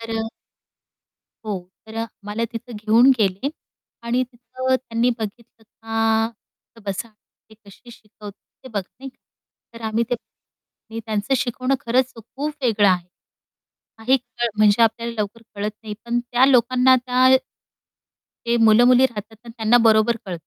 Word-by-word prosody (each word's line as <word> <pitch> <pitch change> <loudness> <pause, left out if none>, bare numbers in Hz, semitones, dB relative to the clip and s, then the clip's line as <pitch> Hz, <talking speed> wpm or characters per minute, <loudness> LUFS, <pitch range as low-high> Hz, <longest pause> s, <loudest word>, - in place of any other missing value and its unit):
तर 225 0 -8
अ 225 - -1 1.2
हो 200 -3 -2 0.3
तर 220 - -11
अ, 225 0 -2 0.2
मला 210 +3 -2
तिथे 235 +1 -7
घेऊन 225 +5 +4
गेले 195 +5 0 0.6
आणि 245 +2 +1
तिथं 255 +2 -2
त्यांनी 240 -1 0
बघितलं, 225 +1 -8 0.2
का 225 0 -2
बसा 200 +4 -3
ते 220 0 -25
कशी 205 +4 -16
शिकवतात 210 -2 -12 0.3
ते - - -9
बघ 210 -5 -2 0.2
नाही 270 +1 -8
का? - - -42 0.6
तर 230 - -11
आम्ही 220 +2 0
ते - - +2 0.9
त्यांचं 215 +3 -1
शिकवणं 255 +2 -1
खरंच 255 +2 +1
खूप 275 +7 -5
वेगळं 215 -4 +3
आहे. 180 -1 +1 0.9
काही 255 +4 +3
क 240 -1 -4
म्हणजे 215 +1 +5
आपल्याला 230 +1 +1
लवकर 215 +2 -3
कळत 205 +1 -2
नाही, 215 -1 -6
पण 235 0 0
त्या 245 +2 +2
लोकांना 255 0 +4
त्या 250 +1 +2 1.2
ते 235 0 +2
मुलं-मुली 245 +4 +6
राहतात 220 -2 -9
आणि 235 - -10
त्यांना 225 +1 +3
बरोबर 220 +2 +4
कळतं. 175 -3 -5
230 Hz, 145 wpm, -22 LUFS, 215-245 Hz, 1.2 s, मुलं-मुली